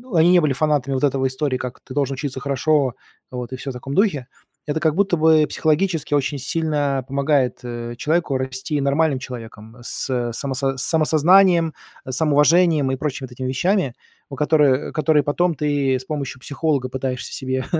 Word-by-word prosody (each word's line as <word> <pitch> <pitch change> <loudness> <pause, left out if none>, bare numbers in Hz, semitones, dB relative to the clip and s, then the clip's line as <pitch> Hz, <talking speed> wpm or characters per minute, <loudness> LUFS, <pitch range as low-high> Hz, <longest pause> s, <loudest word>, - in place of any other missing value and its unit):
они 165 +2 +5
не 180 - +6
были 150 -4 +1
фанатами 140 -2 0
вот 130 - -2
этого 135 -1 +2
истории, 130 0 -2
как 125 -1 -6
ты 130 - -11
должен 140 -1 -1
учиться 135 -1 -4
хорошо, 140 -1 +1 0.3
вот, 125 0 -6
и - - -2
всё 135 +2 -6
в 130 - -5
таком 135 +3 -7
духе. 160 - +1 0.4
Это 150 +1 -2
как 160 -1 +1
будто 195 -2 +2
бы 155 -1 +5
психологически 160 -1 0
очень 145 0 -1
сильно 145 -2 -1
помогает, 140 -2 +1
э, 120 -1 -6
человеку 155 0 0
расти 130 +3 -3
нормальным 140 0 +1
человеком, 115 -3 -9
с 120 -1 -2
само 135 +2 -3
с 135 +1 -1
самосознанием, 165 +4 +4 0.3
с 130 - -5
самоуважением 155 -1 +3
и - - 0
прочими 140 -1 -4
вот - - -20
этими 130 +1 -5
вещами, 155 - 0 0.4
у 140 - -7
которы 145 -2 +2
которые 150 0 +2
потом 170 +5 +1
ты 145 -2 0
с 130 - -12
помощью 140 -4 -5
психолога 140 -3 -1
пытаешься 130 -1 -4
себе 130 -1 -3
140 Hz, 175 wpm, -21 LUFS, 130-155 Hz, 0.4 s, не